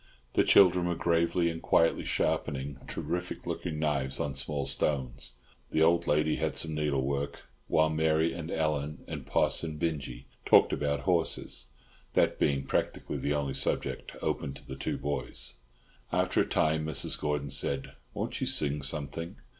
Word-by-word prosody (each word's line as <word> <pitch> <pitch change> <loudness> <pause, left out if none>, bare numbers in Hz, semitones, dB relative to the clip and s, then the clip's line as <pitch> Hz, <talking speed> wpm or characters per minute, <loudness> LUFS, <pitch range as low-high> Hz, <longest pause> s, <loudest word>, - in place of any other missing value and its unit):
The - - +4
children 90 -2 +6
were 85 - 0
gravely 85 +1 +2
and 80 - -7
quietly 80 - +3
sharpening 70 -1 -1
terrific 90 +1 -4
looking 75 - -3
knives 70 -4 0
on 70 - -1
small 70 +1 -1
stones; 65 -3 -1 0.4
the 80 - +3
old 85 +1 +3
lady 75 +1 +2
had 80 0 -1
some 80 -1 -2
needlework; 70 -2 -1 0.2
while 80 0 +3
Mary 80 +1 +2
and 80 -1 -6
Ellen 75 -2 -1
and - - -6
Poss - - +2
and 80 -2 -4
Binjie 70 -6 -3 0.2
talked - - +6
about 70 0 0
horses, 85 -8 0 0.5
that - - +2
being 70 -1 +1
practically - - -1
the 75 - 0
only 70 -2 -1
subject 70 0 -1
open 70 -1 -1
to - - -13
the 65 - -6
two 65 - -2
boys. 70 -3 -3 0.5
After - - +2
a - - 0
time 80 0 +2
Mrs. 80 - -1
Gordon 75 -2 -1
said, 70 0 -1 0.2
"Won't - - -3
you - - 0
sing 75 -1 0
something?" 75 +3 -3
75 Hz, 155 wpm, -30 LUFS, 70-80 Hz, 0.5 s, children